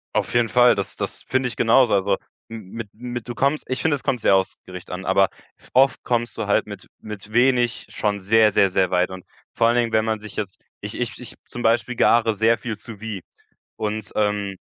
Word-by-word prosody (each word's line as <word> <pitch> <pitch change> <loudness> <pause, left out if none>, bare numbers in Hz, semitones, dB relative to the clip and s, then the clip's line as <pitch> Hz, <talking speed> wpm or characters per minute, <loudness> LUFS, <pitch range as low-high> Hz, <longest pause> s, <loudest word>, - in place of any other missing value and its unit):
Auf - - 0
jeden 120 -1 +2
Fall, 125 +1 +5
das 100 - -4
das - - -5
finde 130 0 0
ich 120 - -6
genauso. 120 +1 +4
Also 100 0 +2 0.3
m 110 -4 -9
mit 115 -3 -6
mit 120 0 -6
du 120 - -5
kommst 140 +3 0
ich 130 - -2
finde, 160 -2 +2
es 140 - -9
kommt 125 - 0
sehr 100 - +4
aufs 95 0 0
Gericht 90 -1 -10
an, 90 +1 -6
aber 95 0 +3 0.4
oft 135 +2 +4
kommst 120 -2 -1
du - - -3
halt - - +2
mit - - -10
mit 105 0 -9
wenig 120 -1 +2
schon 105 -1 -2
sehr, 110 +2 +4
sehr, 100 - +4
sehr 95 0 +1
weit 90 0 +1
und 95 -1 -9 0.3
vor 115 - +3
allen 120 - +3
Dingen, 120 -1 +1
wenn 110 0 +2
man 110 -1 -1
sich 105 -1 -10
jetzt, 100 -3 -5 0.2
ich - - -6
ich - - -3
ich, - - -9
zum 120 - -7
Beispiel, 120 +2 +1
gare 115 -1 +3
sehr 115 +2 +3
viel 115 -3 -5
Sous-vide 105 -3 -8 0.5
und, 110 0 -3
ähm, 105 -2 0
110 Hz, 220 wpm, -22 LUFS, 100-120 Hz, 0.5 s, Fall